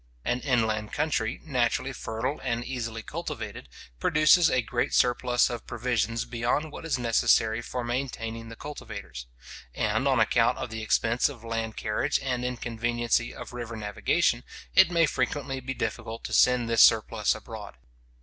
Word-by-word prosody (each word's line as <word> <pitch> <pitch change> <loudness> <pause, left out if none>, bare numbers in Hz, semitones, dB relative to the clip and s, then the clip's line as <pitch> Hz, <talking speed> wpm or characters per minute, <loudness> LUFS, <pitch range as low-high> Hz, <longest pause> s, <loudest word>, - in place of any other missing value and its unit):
An 120 - 0
inland 110 -5 0
country, 125 -6 -1
naturally 130 -2 0
fertile 125 +5 -3
and 120 -2 -2
easily 115 -4 -4
cultivated, 70 - -6 0.3
produces 155 - +5
a 125 - +2
great 120 +2 -1
surplus 125 0 +3
of 120 -1 -6
provisions 115 -1 -1
beyond 120 +6 -1
what 160 - -8
is 155 - +1
necessary 115 -1 +2
for 125 +1 -4
maintaining 115 -2 -4
the 115 - -9
cultivators; 100 - -8 0.5
and - - +1
on - - +3
account - - +3
of - - -5
the 110 0 -4
expense 115 +3 +2
of 125 -6 -11
land 115 -1 -3
carriage, 110 +7 0
and 125 -2 -1
inconveniency 120 -1 -1
of - - -9
river 120 -1 -5
navigation, 120 +5 0 0.3
it 190 -2 +7
may 170 -1 +4
frequently 135 0 -2
be 130 +1 -5
difficult 115 -1 -4
to - - -5
send 125 -2 +4
this 115 -1 +4
surplus - - +4
abroad. - - -9
120 Hz, 150 wpm, -27 LUFS, 115-130 Hz, 0.5 s, it